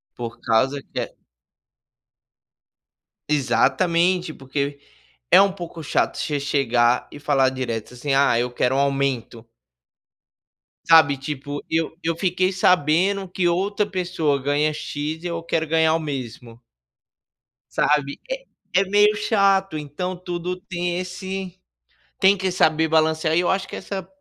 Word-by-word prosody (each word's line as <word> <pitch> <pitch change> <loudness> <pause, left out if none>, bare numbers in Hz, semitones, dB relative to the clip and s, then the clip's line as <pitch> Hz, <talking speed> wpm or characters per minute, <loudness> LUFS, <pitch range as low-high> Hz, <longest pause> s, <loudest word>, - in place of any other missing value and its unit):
por 120 -1 -7
causa 130 +5 +1
que - - -6 2.1
Exatamente, 165 +6 +2
porque 140 +1 -4 0.5
é - - +8
um 195 0 +4
pouco 175 -3 -8
chato 145 - 0
você 145 -2 -2
chegar 125 -4 +1
e 145 - -10
falar 135 -3 +2
direto, 125 -3 -4
assim: 135 +3 -3
"Ah, 135 -4 +4
eu 125 +1 -1
quero 125 +1 0
um - - +1
aumento". 135 -5 -1 1.4
Sabe, 160 -4 +6
tipo, 145 +1 -5
eu 160 0 -1
eu 165 0 -1
fiquei 185 +1 0
sabendo 185 +2 +2
que 180 -1 0
outra 200 +4 0
pessoa 175 -7 -1
ganha 145 +3 +1
"x" 155 +1 -5
e - - -3
eu 170 -1 -3
quero 165 -1 -1
ganhar 160 0 +3
o - - +2
mesmo 125 -5 -6 1.1
sabe? 145 -1 +1
É - - -4 0.3
é 195 - +4
meio 205 +2 +4
chato, 195 -5 +2
então 150 +5 -4
tudo 180 0 -4
tem 175 -1 -3
esse 185 0 -6 0.6
tem 195 +1 +5
que 190 -1 -1
saber 160 -2 +3
balancear, 160 0 +2
e 175 - +4
eu 175 - 0
acho 190 0 0
que - - -8
essa 190 -2 -6
160 Hz, 135 wpm, -22 LUFS, 140-180 Hz, 2.1 s, é